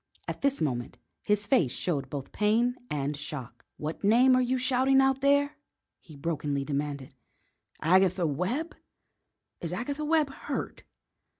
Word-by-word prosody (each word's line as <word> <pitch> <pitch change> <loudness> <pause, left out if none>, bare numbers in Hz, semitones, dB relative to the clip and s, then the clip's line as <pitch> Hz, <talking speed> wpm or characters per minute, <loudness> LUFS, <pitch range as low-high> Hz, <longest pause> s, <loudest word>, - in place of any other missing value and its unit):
At - - -5
this 275 -5 +1
moment 125 -6 -2 0.2
his 210 0 +1
face 190 - +3
showed 140 -2 -2
both 140 -1 -6
pain 230 +4 +2
and 145 0 -2
shock. 145 -3 -8
"What 155 +5 -5
name 245 +5 +5
are 255 - +4
you 255 +1 +1
shouting 260 +1 +3
out 270 0 +3
there?" 285 +1 +3 0.4
he 155 - -15
brokenly 145 -2 -2
demanded. 140 -2 -3 0.7
"Agatha 185 +1 +4
Webb? 190 - -1 0.9
Is 170 - -4
Agatha 280 +10 -3
Webb 305 -2 +2
hurt?" - - -5
190 Hz, 135 wpm, -28 LUFS, -, 0.9 s, name